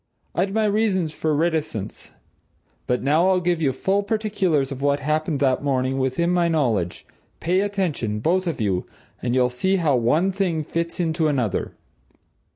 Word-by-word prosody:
I'd 185 +5 0
my 220 +1 +1
reasons 200 -6 +1
for 155 -1 -1
reticence. 155 - -2 0.7
But 125 0 0
now 155 +7 +3
I'll 185 -1 +3
give 175 -2 0
you 140 -4 +2
full 190 +10 0
particulars 200 -9 0
of 135 -1 -6
what 140 0 +2
happened 155 +1 -1
that 130 0 +2
morning 135 -1 0
within 130 +7 0
my 175 -1 +2
knowledge 120 - 0 0.3
pay 180 +3 +1
attention, 175 - -1
both 180 - +1
of 165 - -2
you, 95 -4 -1 0.3
and 120 0 -1
you'll 125 -1 +3
see 190 +10 +1
how 160 -7 +2
one 150 +11 +2
thing 180 -5 -1
fits 170 +3 -3
into 160 -2 +1
another. 125 -9 -1
155 Hz, 160 wpm, -23 LUFS, 130-185 Hz, 0.7 s, now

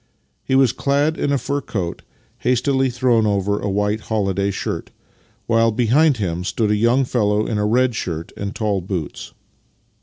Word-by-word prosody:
He 130 - 0
was 135 -3 +5
clad 145 +4 +1
in 145 - -1
a 140 - +2
fur 140 +2 -2
coat, 90 -9 -4 0.4
hastily 130 +2 +1
thrown 120 -3 +2
over 100 0 0
a - - -2
white 105 +2 0
holiday 100 -3 -1
shirt, 100 - -4 0.6
while 115 0 +3
behind 130 +6 +3
him 90 -4 -2
stood 105 +3 0
a - - +3
young 120 +5 +3
fellow 105 -3 +1
in 105 - -2
a 105 - +1
red 125 +3 +2
shirt 85 -4 -4
and 100 0 -5
tall 105 -3 0
boots. 90 -4 -5
110 Hz, 170 wpm, -20 LUFS, 100-130 Hz, 0.6 s, was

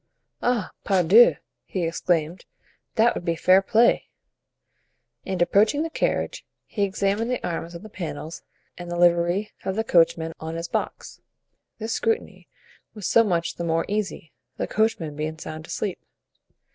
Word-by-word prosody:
"Ah, 240 -4 0
pardieu!" 195 +4 +6 0.3
he 185 - -3
exclaimed; 165 0 -1 0.5
"that 230 +1 +4
would - - -5
be 170 -1 0
fair 185 +3 +5
play." 230 +4 +3 1.2
And 190 -1 -2
approaching 215 - +3
the 325 - -4
carriage, - - -1 0.2
he 210 - -5
examined 200 +3 0
the 250 - -2
arms 170 0 -4
on 170 - -9
the - - -8
panels 165 -5 -6 0.4
and 175 0 -7
the 175 - -3
livery 175 +4 +3
of 190 0 -2
the 220 - 0
coachman 165 -4 +2
on 160 +1 -5
his 165 +1 -4
box. - - -4 0.6
This 225 0 -3
scrutiny 455 -1 -2 0.5
was 210 -3 -7
so 230 - +5
much 170 -5 -1
the 170 - -3
more 165 0 0
easy, 205 -6 -3 0.3
the - - -1
coachman 200 -9 0
being 155 +1 -4
sound 155 0 -8
asleep. 200 -4 -3
185 Hz, 150 wpm, -24 LUFS, 165-215 Hz, 1.2 s, pardieu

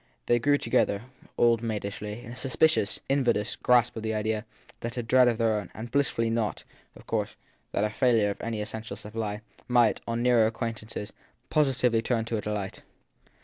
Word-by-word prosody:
They 120 - +3
drew 145 +4 +3
together, 100 -6 +1 0.3
old 115 -1 +4
maid 110 -3 -2
ishly, 105 +3 -5
in 115 - -9
a - - -7
suspicious, 135 -2 +2
invidious 120 -6 +1
grasp 120 -1 +3
of 110 - -4
the 110 0 -2
idea 110 0 -1 0.3
that 115 +1 -5
a 120 - -1
dread 125 +2 +5
of 120 -2 +2
their 115 -1 +2
very 105 -1 +1
own - - -12
and 115 +2 -7
blissfully 125 -5 +1
not, 115 -3 -1 0.3
of - - -15
course, - - -2 0.4
that - - 0
of 105 - 0
a - - -14
failure 115 -6 +3
of - - -8
any 115 -2 -3
essential 110 -1 -5
supply 105 0 -4 0.3
might, 120 -3 +3
on 115 +1 -1
nearer 120 -3 +5
acquaint 115 0 -3
ance, 110 -1 -6 0.4
positively 125 -6 +2
turn 115 -1 0
to 115 0 -2
a - - -2
delight. 105 -2 -4
115 Hz, 195 wpm, -28 LUFS, 105-120 Hz, 0.4 s, dread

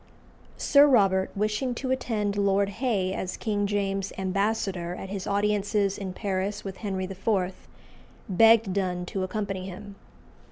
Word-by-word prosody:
Sir 285 0 +6
Robert, 195 -7 +3
wishing 215 +5 -1
to 260 +1 -3
attend 215 -6 -1
Lord 200 0 +2
Hay 200 -8 +1
as 185 -1 -4
King 205 -2 -1
James's 195 -1 -1
ambassador 190 -2 -1
at 195 - -7
his 195 -1 -5
audiences 205 0 +1
in 195 -2 -5
Paris 195 +1 -2
with 195 -1 -6
Henry 190 -3 -3
IV., 190 0 -2 0.6
begged 225 +1 +5
Donne 180 -2 -1
to 190 +2 -4
accompany 190 -1 -3
him. 200 +2 -9
200 Hz, 135 wpm, -27 LUFS, 190-210 Hz, 0.6 s, Sir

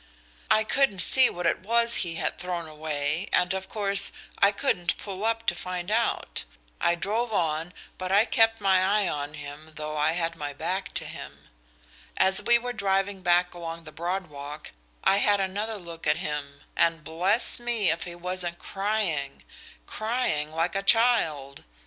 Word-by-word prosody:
"I 215 0 +4
couldn't 270 -3 +1
see 260 -1 +6
what 175 0 -5
it 165 - +2
was 235 +4 +4
he 170 -3 -1
had - - -2
thrown 175 -2 -4
away, 155 +2 -3
and, 180 +1 +2
of 190 0 -5
course, 200 -2 +3 0.3
I 200 - +6
couldn't 200 -6 -1
pull 195 -1 -7
up 225 0 0
to - - +2
find 180 +1 -5
out. 230 - 0 0.4
I 170 - +2
drove 220 +6 -2
on, 165 -3 -1 0.3
but 185 0 -3
I 205 +3 +5
kept 225 -2 +3
my 190 -2 +3
eye 200 +1 +2
on 145 -1 -4
him, 150 +2 -10
though 155 0 -5
I 150 +2 +2
had 170 -1 -1
my 145 -1 -5
back 185 +7 -4
to - - -1
him. - - -10 0.7
As 190 +1 +5
we 235 +3 +4
were 245 +1 -5
driving 195 -2 0
back 175 0 +2
along 165 -1 -7
the 155 - -11
Broad 175 +5 -3
Walk 145 -1 -9 0.3
I 195 - +4
had 205 0 +3
another 205 +3 -2
look 170 -3 -8
at 150 - +3
him, 145 -1 -5
and 165 -2 +1
bless 180 - +2
me 235 -6 +1
if 165 - -3
he 175 -1 -7
wasn't 175 0 -2
crying 195 -10 -2 0.4
crying 215 - -2
like 165 +3 -1
a 195 - +1
child. 195 - +2
180 Hz, 175 wpm, -26 LUFS, 160-205 Hz, 0.7 s, see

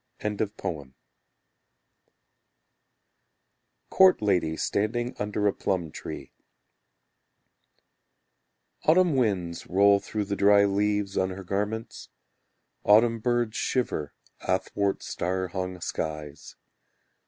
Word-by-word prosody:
Court 190 -1 +6
Lady 90 -6 +1
Standing 120 +4 -1
Under 105 0 -2
a 100 - +3
Plum 90 -5 -2
Tree - - -8 2.5
Autumn 170 -1 +4
winds 95 -9 -1
roll 100 +2 +4
through 105 +1 -4
the 100 0 -2
dry 100 0 +5
leaves 100 0 0
On 95 - +1
her 95 +1 -7
garments; 105 +4 -4 0.7
Autumn 115 +2 +5
birds 120 -1 0
shiver 95 - -2 0.3
Athwart 100 -1 -1
star 95 +1 -2
hung 90 0 -4
skies. 75 -3 -5
100 Hz, 85 wpm, -27 LUFS, 95-110 Hz, 2.5 s, Court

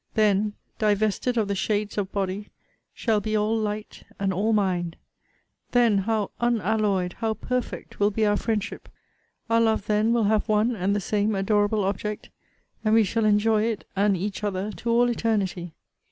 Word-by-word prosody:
Then, 210 -1 +2 0.3
divested 215 +3 +1
of 215 -3 +2
the 200 - -1
shades 205 +1 -1
of 200 -2 -2
body, 200 +1 -3 0.4
shall 220 -3 0
be 215 +2 -2
all 215 +1 +1
light 215 -1 -4 0.2
and 195 -1 0
all 205 +5 +1
mind! 180 -5 0 0.8
Then 235 -5 +4
how 210 0 -1
unalloyed, 215 -6 +1
how 220 -1 0
perfect, 250 +1 -4
will 205 0 +4
be 215 +1 0
our 205 0 +3
friendship! 215 -1 -3 0.6
Our 230 0 +3
love 220 -3 +1
then 215 +2 +2
will 235 -1 +2
have 215 +2 +1
one 215 +3 +2
and 200 0 0
the 205 - 0
same 210 +2 0
adorable 205 +1 +1
object, 205 +2 -3 0.5
and 215 0 +3
we 225 - +6
shall 220 +2 0
enjoy 210 +1 +3
it 225 -3 -2
and 200 0 +2
each 200 +3 -4
other 200 0 -2
to 235 - -5
all 240 +1 +4
eternity! 200 -8 -1
210 Hz, 170 wpm, -25 LUFS, 200-220 Hz, 0.8 s, we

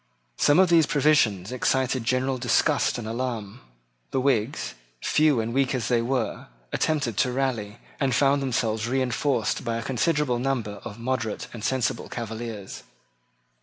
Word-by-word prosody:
Some 145 - +4
of 185 -1 +5
these 165 -3 +5
provisions 130 - +2
excited 130 -1 0
general 130 +1 0
disgust 120 0 +2
and 115 -3 -5
alarm. 115 -1 -4 0.5
The - - 0
Whigs, 130 -2 0 0.3
few 150 - +3
and 115 +1 -2
weak 135 0 +1
as 125 - -2
they 120 -2 +3
were, 125 -1 -2 0.3
attempted 145 -9 0
to 125 - +2
rally, 120 -5 -2 0.2
and 135 -3 +1
found 140 +1 +3
themselves 115 -4 -1
reinforced 130 -1 0
by 115 -2 -2
a 115 - -4
considerable 135 0 +1
number 120 -6 -2
of 105 -2 -8
moderate 115 -3 -3
and 110 -3 -8
sensible 130 0 -1
Cavaliers. 110 -3 -6
125 Hz, 145 wpm, -25 LUFS, 115-135 Hz, 0.5 s, of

